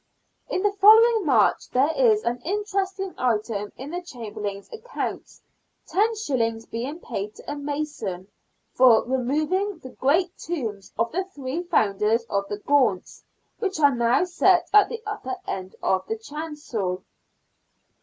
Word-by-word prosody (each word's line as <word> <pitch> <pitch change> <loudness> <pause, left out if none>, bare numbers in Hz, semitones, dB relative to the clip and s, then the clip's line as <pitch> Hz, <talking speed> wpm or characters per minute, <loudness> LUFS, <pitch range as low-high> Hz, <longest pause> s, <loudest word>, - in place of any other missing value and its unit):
In 370 - -1
the 415 - +3
following 435 0 +6
March 230 -7 +3
there 275 +5 +2
is 445 -4 +4
an 240 +1 -2
interesting 390 0 -2
item 215 -4 -1
in 275 +4 -7
the 355 +1 -3
Chamberlain's 210 - -6
accounts, 460 +2 -6 0.5
los. 275 - 0
being 255 +8 -5
paid 210 - -5
to - - -8
a - - -3
mason 285 -11 -4 0.2
" - - -47
for 250 -3 +6
removing 305 +10 0
the 260 -5 -11
great 335 +7 +1
tombs 225 - -5
of 230 0 0
the 370 +4 -1
three 290 -3 -5
founders 220 - +1
of 200 0 0
the 205 - -3
Gaunts, 255 -5 +1 0.4
which 385 -7 -2
are 285 -2 +5
now 235 +5 +2
set 360 0 +2
at 420 -1 +7
the 460 -1 -6
upper 415 -12 -4
end 190 -1 -5
of 190 - +1
the 445 - -2
chancel." 295 - -5
285 Hz, 145 wpm, -24 LUFS, 225-380 Hz, 0.5 s, at